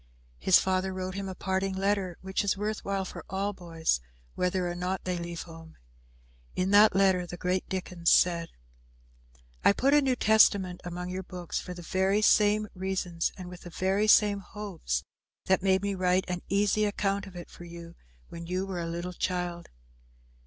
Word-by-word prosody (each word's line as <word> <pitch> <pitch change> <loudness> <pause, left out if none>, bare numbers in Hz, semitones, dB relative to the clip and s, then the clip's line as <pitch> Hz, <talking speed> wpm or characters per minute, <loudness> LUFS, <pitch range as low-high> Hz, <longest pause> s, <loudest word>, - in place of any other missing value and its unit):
His 185 - +6
father 190 0 0
wrote 185 0 -4
him 195 0 -4
a 190 - -6
parting 190 +1 -1
letter, 195 -2 0
which 190 +1 -1
is 200 -1 0
worth 210 +1 -3
while 195 -1 -2
for - - -8
all 195 +2 -1
boys, 165 - -1 0.3
whether 180 0 0
or 175 - -2
no 180 +2 -2
they 180 -1 -2
leave 170 0 -5
home. 165 -1 -13 0.8
In 185 +1 0
that 205 0 +7
letter 190 -2 +3
the 175 - -7
great 180 +1 -1
Dickens 180 -3 -1
said, 170 -2 +4 1.1
"I - - +6
put 270 +7 +2
a 295 - +6
New 265 -2 +1
Testament 200 -5 +4
among 180 +1 -5
your 185 +1 -3
books 180 -2 -5
for 180 - -7
the 175 - -9
very 190 +4 +1
same 210 0 +4
reasons 185 -3 -2
and 185 -2 -8
with 180 0 -10
the 175 - -9
very 190 +4 0
same 210 -1 +5
hopes 190 - -4 0.4
that 190 0 +3
made 190 0 +2
me 200 0 0
write 185 0 +1
an 180 -1 -3
easy 205 +2 +2
account 200 -1 -1
of 190 - -12
it 175 - -9
for 175 - -11
you 170 0 -10 0.3
when 170 0 -9
you 185 +2 -1
were 190 -2 -4
a 165 - -3
little 170 +2 -4
child. 175 -1 -3
185 Hz, 185 wpm, -28 LUFS, 175-195 Hz, 1.1 s, that